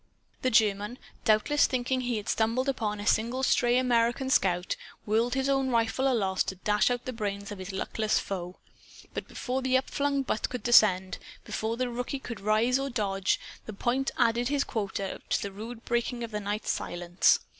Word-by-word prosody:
The 255 - +2
German, 210 0 +2 0.3
doubtless 220 +7 +4
thinking 255 0 -1
he 245 -2 -1
had 210 - -6
stumbled 230 +4 +1
upon 215 -6 -1
a 205 - -5
single 235 +5 +1
stray 245 -2 +3
American 245 +1 +2
scout, 180 -5 +2 0.3
whirled 230 +4 +1
his 265 0 0
own 270 -1 +2
rifle 240 +3 +2
aloft, 195 -6 +1
to 190 - -3
dash 210 +4 +2
out 245 -1 -2
the 255 - -4
brains 200 -3 -4
of 205 - -7
his 185 +2 -6
luckless 215 +3 0
foe. 180 -2 -4 0.6
But - - -5
before 260 0 -3
the 260 0 +3
upflung 280 +1 0
butt 235 - -1
could 250 - -5
descend, 190 -6 +4 0.3
before 225 +1 -2
the 255 0 0
rookie 245 +3 -3
could 240 -5 -7
rise 220 +5 +2
or 275 0 -2
dodge, 195 -6 0 0.3
the 215 - -5
point 250 +6 0
added 235 0 +2
his 285 +1 +1
quota 200 -4 -3
to - - +2
the 200 - -4
rude 225 +4 -8
breaking 240 0 -1
of 230 - -5
the 210 - -2
night's 205 +1 -2
silence. 175 +1 +2
230 Hz, 185 wpm, -28 LUFS, 205-255 Hz, 0.6 s, doubtless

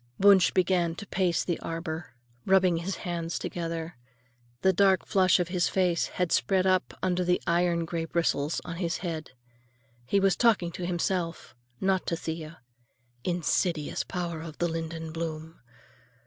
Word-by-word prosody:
Wunsch 195 -2 +7
began 175 -2 +2
to 205 - -8
pace 185 -4 +1
the 175 - -1
arbor, 165 -4 -5 0.3
rubbing 185 -3 +4
his 180 +3 -3
hands 170 -1 -2
together. 165 -2 -4 0.7
The 190 0 +5
dark 190 0 +3
flush 185 -3 +4
of 175 -1 -1
his 175 -1 +1
face 180 -3 +1
had 180 -2 -2
spread 190 -1 +2
up 185 -1 +1
under 180 0 +1
the 180 0 +2
iron 170 0 +2
gray 165 -1 -3
bristles 165 -2 0
on 170 -1 -5
his 170 -1 -1
head. 160 -5 -4 0.7
He 200 - +3
was 195 -1 +3
talking 215 -8 +3
to 175 +1 -5
himself, 175 -1 -2 0.3
not 190 -1 +1
to 170 - 0
Thea. 160 -1 -6 0.6
Insidious 170 -2 0
power 170 -3 -4
of 160 -2 -8
the 175 - +1
linden 165 -1 -4
bloom! 160 0 -5
175 Hz, 150 wpm, -28 LUFS, 165-185 Hz, 0.7 s, Wunsch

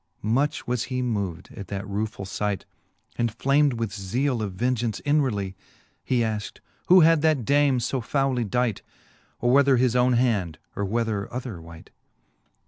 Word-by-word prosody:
Much 135 +8 0
was 125 -1 -1
he 130 -1 -3
moved 100 -8 -3
at 100 - -8
that 100 +2 -5
ruefull 105 0 -3
fight, 100 +1 -2 0.5
And 120 -1 +1
flam'd 140 +4 +2
with 115 -4 -3
zeale 115 +6 -1
of 100 -3 -3
vengeance 120 +1 -1
inwardly; 125 -11 0 0.5
He 125 -2 +1
afkt, 110 -2 -3 0.3
who 185 +1 +8
had 165 -1 +5
that 155 -7 +2
dame 140 -1 +3
fo 130 +2 -2
fouly 130 -3 0
dight; 120 -2 0 0.6
Or 120 - +2
whether 140 0 +5
his 125 -1 +2
owne 125 0 +4
hand, 105 -10 +1 0.2
or 100 - -1
whether 110 -1 -2
other 120 -8 -5
wight? 80 0 -13
120 Hz, 155 wpm, -25 LUFS, 100-130 Hz, 0.6 s, who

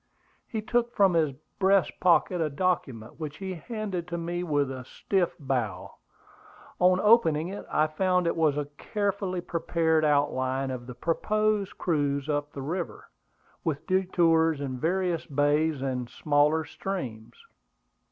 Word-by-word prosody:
He 220 -3 -4
took 240 +1 0
from 195 -3 +4
his 155 -4 +2 0.3
breast 195 -1 +4
pocket 180 0 +3
a 155 - +1
document, 140 -8 -2
which 150 -2 -5
he 190 -1 -4
handed 185 0 -4
to 170 -1 -3
me 170 +1 -3
with 145 -5 0
a 130 -1 -6
stiff 180 +7 -1
bow. 130 -7 -2 0.9
On 180 0 +5
opening 185 -7 +4
it, 200 - -7
I 155 - +3
found 180 +3 +1
it 170 - +1
was 155 -3 +2
a 145 - -1
carefully 200 -3 -2
prepared 165 -2 +1
outline 135 -3 +1
of 125 -1 -6
the 125 - -8
proposed 210 - 0
cruise 145 -4 0
up 145 0 -1
the 135 - -6
river, 170 +5 -5 0.5
with 150 -3 -2
detours 165 -4 +2
in 130 -3 -4
various 175 +1 0
bays 145 +1 +1
and 125 -3 -2
smaller 150 +1 +2
streams. 130 - -6
160 Hz, 140 wpm, -27 LUFS, 145-185 Hz, 0.9 s, On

